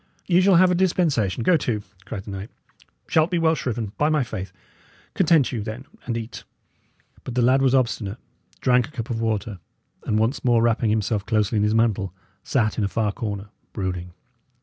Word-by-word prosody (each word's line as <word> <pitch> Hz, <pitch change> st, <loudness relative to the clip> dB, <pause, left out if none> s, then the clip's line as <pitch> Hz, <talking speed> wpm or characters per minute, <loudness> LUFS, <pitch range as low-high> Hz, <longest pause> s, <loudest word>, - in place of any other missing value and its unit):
"Ye 180 Hz, 0 st, +4 dB
shall 190 Hz, 0 st, +5 dB
have 180 Hz, +1 st, +6 dB
a -, -, +3 dB
dispensation, 165 Hz, -, +1 dB
go 175 Hz, +4 st, +5 dB
to!" 110 Hz, -7 st, -2 dB, 0.2 s
cried 100 Hz, -1 st, -6 dB
the 100 Hz, -, -8 dB
knight. 95 Hz, +2 st, -6 dB, 0.6 s
"Shalt 160 Hz, +1 st, +3 dB
be 180 Hz, -, 0 dB
well 165 Hz, -1 st, +3 dB
shriven, 120 Hz, -7 st, -3 dB
by 150 Hz, -, +3 dB
my 155 Hz, -3 st, +2 dB
faith! 95 Hz, -6 st, -6 dB, 0.6 s
Content 165 Hz, -6 st, +3 dB
you, 120 Hz, -4 st, -3 dB
then, 110 Hz, +5 st, -6 dB, 0.2 s
and 115 Hz, -1 st, -1 dB
eat." 115 Hz, 0 st, -7 dB, 0.8 s
But 125 Hz, -, -6 dB
the 125 Hz, -, +2 dB
lad 130 Hz, +3 st, +4 dB
was 135 Hz, -1 st, +3 dB
obstinate, 115 Hz, -6 st, 0 dB, 0.4 s
drank 125 Hz, -2 st, +3 dB
a -, -, -16 dB
cup 120 Hz, -3 st, -5 dB
of 115 Hz, -1 st, -2 dB
water, 110 Hz, -3 st, -2 dB, 0.4 s
and, 110 Hz, -, 0 dB
once 115 Hz, +6 st, 0 dB
more 120 Hz, -2 st, +3 dB
wrapping 115 Hz, -1 st, +2 dB
himself 105 Hz, -1 st, 0 dB
closely 110 Hz, -1 st, +1 dB
in 105 Hz, -, +2 dB
his 105 Hz, +1 st, +2 dB
mantle, 100 Hz, -5 st, +1 dB, 0.3 s
sat 110 Hz, -6 st, 0 dB
in -, -, +1 dB
a -, -, +2 dB
far 105 Hz, 0 st, 0 dB
corner, 100 Hz, -1 st, -5 dB, 0.2 s
brooding. 90 Hz, -3 st, -4 dB
115 Hz, 195 wpm, -23 LUFS, 105-135 Hz, 0.8 s, have